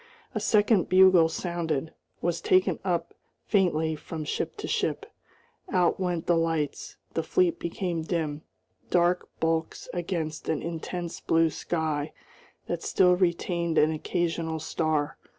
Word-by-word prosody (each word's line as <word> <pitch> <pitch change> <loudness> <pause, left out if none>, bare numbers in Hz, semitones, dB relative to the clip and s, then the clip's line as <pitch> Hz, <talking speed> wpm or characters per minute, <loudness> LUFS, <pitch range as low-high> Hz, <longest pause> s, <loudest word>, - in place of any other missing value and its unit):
A - - -1
second 210 -3 +3
bugle 185 -3 +6
sounded, 160 -3 -2 0.3
was 170 -1 0
taken 185 0 +3
up 170 -3 -1 0.3
faintly 160 -6 +2
from 155 +1 -6
ship 300 - -3
to 415 - -5
ship. - - -1 0.7
Out 180 -1 +2
went 175 -3 -1
the 175 - +3
lights; 165 -3 -1 0.2
the - - 0
fleet 365 -3 +1
became 170 -1 -2
dim, 160 -3 -2 0.5
dark 175 0 +2
bulks 160 0 -1
against 165 -3 -3
an 155 - -1
intense 170 +1 -4
blue 165 -1 +2
sky 155 -3 -2 0.5
that - - -3
still 180 -1 +4
retained 170 -2 0
an 155 +1 +5
occasional 165 0 -1
star. 155 -1 -1
170 Hz, 130 wpm, -27 LUFS, 160-180 Hz, 0.7 s, bugle